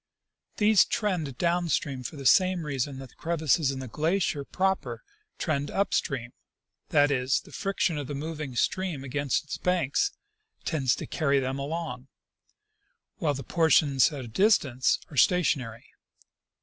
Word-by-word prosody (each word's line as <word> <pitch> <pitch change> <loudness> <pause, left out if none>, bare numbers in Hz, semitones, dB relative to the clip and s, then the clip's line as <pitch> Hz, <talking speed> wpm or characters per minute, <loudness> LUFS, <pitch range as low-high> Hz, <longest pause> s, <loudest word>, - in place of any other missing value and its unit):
These 210 -2 +5
trend 170 - -2
down 175 0 +1
stream 135 -4 -1
for 125 +5 -6
the 140 -2 -8
same 185 +4 +4
reason 140 -1 -2
that 135 -1 -9
the - - -23
crevasses 160 -3 +1
in 135 - -2
the 130 0 -6
glacier 155 - 0
proper 190 +6 -1 0.3
trend 145 -3 -1
up 200 +1 0
stream 125 -5 -1 0.3
— - - -62 0.2
that 145 0 +4
is, 130 0 +1
the - - -17
friction 195 -5 -1
of 145 - -5
the 145 - -4
moving 150 -2 -5
stream 175 0 -1
against 140 +1 -1
its 150 - -6
banks 180 - +1 0.6
tends 135 -6 +1
to - - -6
carry 140 -4 +1
them 135 +1 -2
along, 140 -3 -4 1.1
while 145 -3 0
the 135 - -6
portions 155 -2 +3
at 140 -4 -6
a - - -8
distance 135 - +2
are 145 - -9
stationary. 130 -10 +2
145 Hz, 155 wpm, -27 LUFS, 135-170 Hz, 1.1 s, These